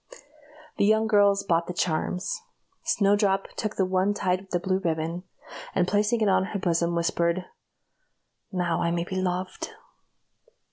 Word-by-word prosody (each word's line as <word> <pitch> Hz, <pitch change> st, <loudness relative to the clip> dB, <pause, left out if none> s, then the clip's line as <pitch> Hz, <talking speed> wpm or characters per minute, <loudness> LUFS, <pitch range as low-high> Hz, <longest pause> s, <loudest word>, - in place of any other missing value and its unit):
The -, -, +3 dB
young 220 Hz, +1 st, +4 dB
girls 205 Hz, -2 st, +4 dB
bought 170 Hz, -2 st, +1 dB
the 180 Hz, -, -4 dB
charms. 180 Hz, +2 st, -1 dB, 0.4 s
Snowdrop 205 Hz, -10 st, +2 dB
took 215 Hz, -1 st, -3 dB
the 190 Hz, -, +2 dB
one 190 Hz, +2 st, +1 dB
tied 185 Hz, -2 st, 0 dB
with 175 Hz, -1 st, -1 dB
blue 190 Hz, 0 st, +1 dB
ribbon, 165 Hz, 0 st, -2 dB, 0.5 s
and 180 Hz, -, +2 dB
placing 210 Hz, +4 st, +1 dB
it 215 Hz, -, +3 dB
in 190 Hz, -1 st, +4 dB
her 200 Hz, 0 st, -4 dB
bosom, 170 Hz, -1 st, +1 dB
whispered, 170 Hz, +1 st, 0 dB, 1.1 s
"Now 175 Hz, -3 st, 0 dB
I 170 Hz, -, +1 dB
may 170 Hz, 0 st, 0 dB
be 185 Hz, +2 st, -5 dB
loved." 185 Hz, 0 st, -3 dB
185 Hz, 145 wpm, -26 LUFS, 170-200 Hz, 1.1 s, young